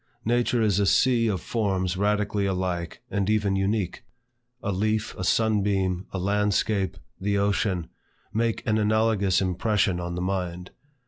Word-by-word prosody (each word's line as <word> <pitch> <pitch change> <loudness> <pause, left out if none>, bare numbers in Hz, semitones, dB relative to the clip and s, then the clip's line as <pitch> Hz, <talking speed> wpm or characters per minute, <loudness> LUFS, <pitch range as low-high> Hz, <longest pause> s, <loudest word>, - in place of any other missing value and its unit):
Nature 120 0 +2
is 100 -3 +2
a 100 - +3
sea 120 +1 +3
of 100 -4 0
forms 95 -5 -1
radically 105 0 0
alike 90 -3 -3
and 100 0 0
even 105 -2 +2
unique. 95 -1 -1 0.6
A 100 - -1
leaf, 110 +3 0
a 95 - -5
sun 110 +2 +2
beam, 95 -2 0
a - - -5
landscape, 100 +1 0 0.2
the 100 +1 0
ocean, 100 -3 0 0.5
make 115 +1 0
an 110 0 +2
analogous 105 -3 +2
impression 95 0 +1
on 85 0 -4
the - - -3
mind. 90 -1 -3
100 Hz, 145 wpm, -26 LUFS, 95-110 Hz, 0.6 s, a